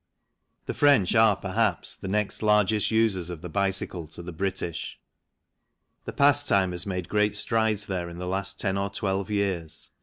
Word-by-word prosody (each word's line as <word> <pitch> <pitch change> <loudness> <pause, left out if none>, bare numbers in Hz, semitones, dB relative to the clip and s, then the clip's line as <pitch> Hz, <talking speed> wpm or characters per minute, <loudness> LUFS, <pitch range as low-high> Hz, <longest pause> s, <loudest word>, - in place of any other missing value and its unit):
The - - -3
French 140 -11 +4
are, 110 -2 +5
perhaps, - - -1
the - - -8
next 105 +1 -1
largest 105 0 +3
users 110 -6 +1
of 85 -3 -7
the 90 - -6
bicycle 95 -3 -1
to 85 +3 -10
the 90 - -7
British. 90 -1 -4 1.1
The - - -4
pastime 140 -10 +3
has 90 +2 -4
made 90 -3 -3
great 105 0 +1
strides 110 -1 0
there 90 -3 -3
in 85 - -9
the 90 - -5
last 100 +2 -3
ten 100 -1 0
or 100 +1 -1
twelve 95 0 -2
years. 95 -6 -2
100 Hz, 170 wpm, -26 LUFS, 90-105 Hz, 1.1 s, are